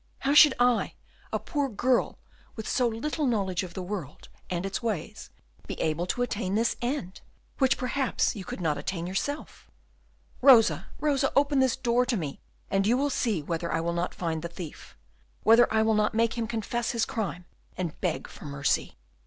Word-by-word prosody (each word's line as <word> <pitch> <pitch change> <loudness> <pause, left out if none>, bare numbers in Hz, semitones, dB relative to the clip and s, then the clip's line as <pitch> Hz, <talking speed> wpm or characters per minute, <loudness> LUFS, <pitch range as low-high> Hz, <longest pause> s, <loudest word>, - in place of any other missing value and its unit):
How 275 - +2
should 295 -2 +8
I, 245 -1 +2 0.4
a - - +1
poor 285 -3 -2
girl, 245 +3 +1 0.4
with 220 - -6
so 250 - +2
little 280 +6 -2
knowledge 195 -7 0
of 180 -3 -8
the 185 - -4
world 180 -7 -6 0.2
and 175 +1 -2
its 195 - -3
ways, 215 -9 -4 0.4
be - - -6
able 160 +3 0
to 245 - 0
attain 205 -5 -2
this 230 +2 +1
end, 240 -7 -3 0.4
which 265 -2 +3
perhaps 255 0 0
you 200 - -6
could - - -7
not 155 -4 0
attain 170 +3 -3
yourself?" 240 - -4 0.7
"Rosa, 250 -4 +6
Rosa, 280 -2 +1
open 280 0 +3
this 260 -2 +3
door 245 -1 +2
to 240 - +1
me, 150 -6 -5 0.3
and 195 0 +2
you 240 +3 +4
will 285 +1 +1
see 215 - 0
whether 170 +2 -3
I 165 - +1
will 170 +1 -1
not 175 +1 -2
find 165 -3 -2
the 170 - -4
thief, 170 -2 -10 0.5
whether 230 +2 +6
I 220 0 +3
will 220 0 +3
not 210 0 +1
make 230 0 +2
him 230 -2 -2
confess 235 +1 -2
his 230 -2 +1
crime 185 -5 -4 0.3
and 175 -4 -4
beg 175 -4 -1
for - - -12
mercy." 140 -1 -1
220 Hz, 185 wpm, -27 LUFS, 175-250 Hz, 0.7 s, should